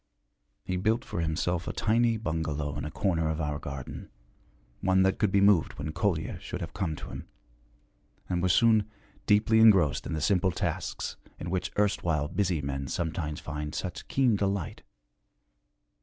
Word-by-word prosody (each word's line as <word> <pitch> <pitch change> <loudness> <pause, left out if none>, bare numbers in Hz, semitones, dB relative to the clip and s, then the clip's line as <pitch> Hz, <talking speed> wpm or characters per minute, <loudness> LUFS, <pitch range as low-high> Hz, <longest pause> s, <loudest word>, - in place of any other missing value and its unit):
He 90 - -2
built 110 +6 +1
for 85 - -3
himself 85 +1 -1
a - - -2
tiny 115 +1 +2
bungalow 75 -7 -2
in 75 -1 -4
a - - -3
corner 85 -3 0
of 80 0 -2
our 75 -2 -2
garden, 70 -3 -7 0.7
one 95 0 +3
that 95 0 +1
could 105 - +2
be 100 - +4
moved 100 -5 +4
when 75 +2 -4
Kolya 85 -2 -1
should - - -6
have - - -6
come 80 -5 -2
to - - -8
him, - - -8 1.0
and 90 -1 -1
was 90 0 +3
soon 110 0 +4 0.4
deeply 110 +2 +4
engrossed 90 -11 +5
in - - -3
the 80 - -1
simple 95 +4 +2
tasks 85 - -3 0.2
in 85 - -5
which 95 -1 -1
erstwhile 85 -7 +1
busy 90 -4 0
men 70 0 -3
sometimes 80 -1 -3
find 75 -1 -5
such 95 - -5
keen 130 -5 +3
delight. 100 -4 -2
90 Hz, 165 wpm, -28 LUFS, 75-100 Hz, 1.0 s, engrossed